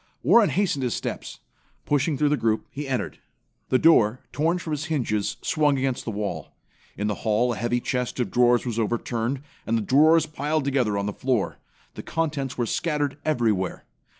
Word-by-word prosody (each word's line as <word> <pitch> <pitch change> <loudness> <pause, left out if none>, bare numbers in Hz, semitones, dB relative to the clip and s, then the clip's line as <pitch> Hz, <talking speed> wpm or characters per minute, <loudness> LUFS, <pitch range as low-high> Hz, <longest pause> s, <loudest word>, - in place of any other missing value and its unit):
Warren 205 - +5
hastened 170 -3 0
his 125 -2 -1
steps. - - -5 0.4
Pushing 145 0 +1
through 150 +1 +2
the 150 - +3
group, 110 -5 0
he 145 +1 -5
entered. 130 -2 -3 0.5
The 130 - +4
door, 125 -6 +4
torn 165 +4 +1
from 165 -3 -4
its 150 0 -3
hinges, 120 - -1
swung 150 -3 +2
against 130 -1 -1
the - - -3
wall. 105 -1 -4 0.4
In 105 - -2
the 105 - 0
hall 115 +3 +2
a - - -6
heavy 120 +1 0
chest 125 +1 -2
of 125 - -1
drawers 120 0 +3
was 115 -2 -2
overturned 120 +3 -1 0.3
and 115 +1 +2
the - - 0
drawers 155 +7 +5
piled 150 -1 -2
together 125 -7 +1
on 100 - -1
the 105 - -2
floor. 125 -4 -1 0.3
The - - -7
contents 145 -5 -2
were 120 - 0
scattered 145 +1 -1
everywhere. 110 - 0
130 Hz, 180 wpm, -25 LUFS, 115-150 Hz, 0.5 s, Warren